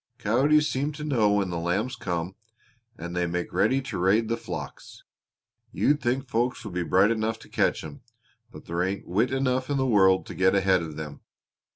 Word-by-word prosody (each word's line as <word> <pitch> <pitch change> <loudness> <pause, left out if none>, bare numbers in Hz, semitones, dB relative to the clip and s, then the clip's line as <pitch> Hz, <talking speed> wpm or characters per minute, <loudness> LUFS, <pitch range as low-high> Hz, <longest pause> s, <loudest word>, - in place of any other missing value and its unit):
Coyotes 145 +8 +3
seem 140 +3 -1
to 150 +1 -7
know 120 -9 +2
when 100 -3 0
the 85 - -2
lambs 100 +10 -1
come 90 0 -3 0.6
and 85 +2 -6
they 90 -1 0
make 90 +1 -3
ready 135 +1 +2
to 130 - -5
raid 105 +5 +2
the 115 - +1
flocks. - - -8 0.7
You'd 150 +1 +1
think 130 +2 -1
folks 120 +1 -1
would 105 - -6
be 90 - -1
bright 95 +5 +3
enough 110 0 -1
to - - -15
catch - - 0
'em, 75 -2 -9 0.5
but - - -13
there 85 +1 -2
ain't 95 +2 -2
wit 110 +8 +1
enough 130 0 0
in 145 - 0
the 135 - +1
world 95 -6 +4
to - - -8
get 95 +1 +2
ahead 95 -2 +3
of 80 -2 -6
them. 75 -2 -7
105 Hz, 200 wpm, -26 LUFS, 90-130 Hz, 0.7 s, world